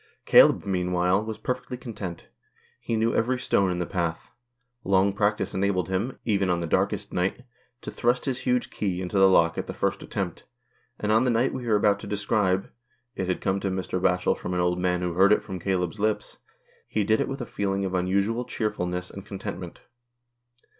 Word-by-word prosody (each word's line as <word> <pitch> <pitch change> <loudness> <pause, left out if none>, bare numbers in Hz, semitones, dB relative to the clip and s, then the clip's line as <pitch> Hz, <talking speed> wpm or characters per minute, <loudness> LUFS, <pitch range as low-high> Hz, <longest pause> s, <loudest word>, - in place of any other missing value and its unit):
Caleb, - - +6
meanwhile, 90 0 +1
was 110 0 -5
perfectly 125 0 -4
content. 100 -8 -7 0.5
He 115 - -2
knew 110 +1 +1
every 125 +3 +1
stone 100 -6 +2
in 90 - -1
the 90 - -1
path; 85 -3 -3 0.5
long 95 +1 +3
practice 100 -1 0
enabled 95 -2 0
him, 100 +8 -2
even 100 -4 +1
on 90 -1 +1
the 85 - -2
darkest 100 +4 0
night, 95 +7 -1 0.4
to - - -6
thrust 120 +1 0
his 130 -3 -1
huge 125 -1 0
key 95 -4 -2
into 95 +2 -1
the 95 0 +7
lock 85 -3 +3
at - - -4
the - - -6
first - - -1
attempt, - - -4 0.6
and 105 - 0
on 110 +3 +4
the 130 - +2
night 120 +2 +2
we 125 -2 -5
are 110 - +3
about 100 -1 +3
to - - -8
describe 100 -2 0 0.2
— 120 +1 -44
it 95 - -2
had 90 - -1
come 95 0 0
to 100 - -2
Mr. 95 -1 -2
Batchel 90 -1 +2
from 90 - -4
an - - 0
old 90 0 +1
man 90 0 0
who 90 -1 -1
heard 95 +4 +5
it 105 - +4
from 95 -1 -6
Caleb's 90 +1 -1
lips 110 +1 -1 0.2
— - - -33
he 105 - 0
did 110 +2 +2
it - - 0
with 135 +1 -4
a 125 - -4
feeling 100 -2 -2
of 95 - -3
unusual 100 +6 +1
cheerfulness 90 -6 -3
and 100 - -9
contentment. 95 -3 -7
100 Hz, 205 wpm, -26 LUFS, 90-110 Hz, 0.6 s, the